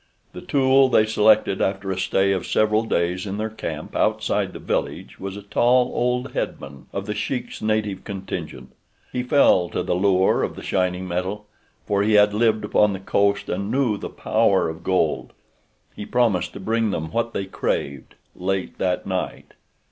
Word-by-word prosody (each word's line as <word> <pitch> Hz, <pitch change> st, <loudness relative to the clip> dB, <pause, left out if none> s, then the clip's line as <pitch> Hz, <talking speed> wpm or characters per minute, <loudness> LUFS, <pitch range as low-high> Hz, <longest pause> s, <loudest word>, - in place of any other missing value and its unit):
The -, -, -8 dB
tool 135 Hz, -1 st, +3 dB
they 110 Hz, -, +4 dB
selected 110 Hz, -2 st, +3 dB
after 95 Hz, 0 st, -1 dB
a 95 Hz, -, -3 dB
stay 95 Hz, 0 st, +2 dB
of 95 Hz, -2 st, -1 dB
several 110 Hz, 0 st, +2 dB
days 90 Hz, -1 st, -1 dB
in 100 Hz, +1 st, -4 dB
their 110 Hz, +1 st, -3 dB
camp 110 Hz, -, -6 dB
outside -, -, 0 dB
the -, -, -8 dB
village -, -, -3 dB
was 95 Hz, +1 st, -6 dB
a 100 Hz, -, -9 dB
tall, 120 Hz, +4 st, +2 dB
old 125 Hz, +2 st, -1 dB
headman 70 Hz, 0 st, -5 dB
of 100 Hz, 0 st, -4 dB
The 105 Hz, -, -3 dB
Sheik's 120 Hz, +4 st, -4 dB
native 110 Hz, -3 st, -1 dB
contingent. 95 Hz, -10 st, -6 dB, 0.4 s
He 125 Hz, -, -2 dB
fell 125 Hz, -, +4 dB
to -, -, -2 dB
the 90 Hz, -, -1 dB
lure 95 Hz, 0 st, +3 dB
of -, -, -2 dB
the -, -, -9 dB
shining 90 Hz, -1 st, -1 dB
metal, 95 Hz, +4 st, -3 dB, 0.4 s
for 100 Hz, -1 st, +1 dB
he 105 Hz, +1 st, +2 dB
had 105 Hz, 0 st, +5 dB
lived 110 Hz, -1 st, +2 dB
upon 105 Hz, 0 st, +3 dB
the 95 Hz, -, -5 dB
coast 100 Hz, +1 st, +1 dB
and 100 Hz, +1 st, -3 dB
knew 130 Hz, -3 st, +1 dB
the -, -, -6 dB
power 110 Hz, -6 st, +1 dB
of 80 Hz, +2 st, -8 dB
gold. 90 Hz, -4 st, 0 dB, 0.6 s
He 105 Hz, -, -7 dB
promised 100 Hz, -8 st, +1 dB
to -, -, -8 dB
bring 110 Hz, +3 st, 0 dB
them 80 Hz, -5 st, -3 dB
what 115 Hz, +1 st, -1 dB
they 95 Hz, -, -2 dB
craved, 70 Hz, -7 st, -3 dB, 0.2 s
late 95 Hz, +1 st, -3 dB
that 90 Hz, -1 st, 0 dB
night. 95 Hz, -1 st, -4 dB
100 Hz, 180 wpm, -23 LUFS, 95-110 Hz, 0.6 s, had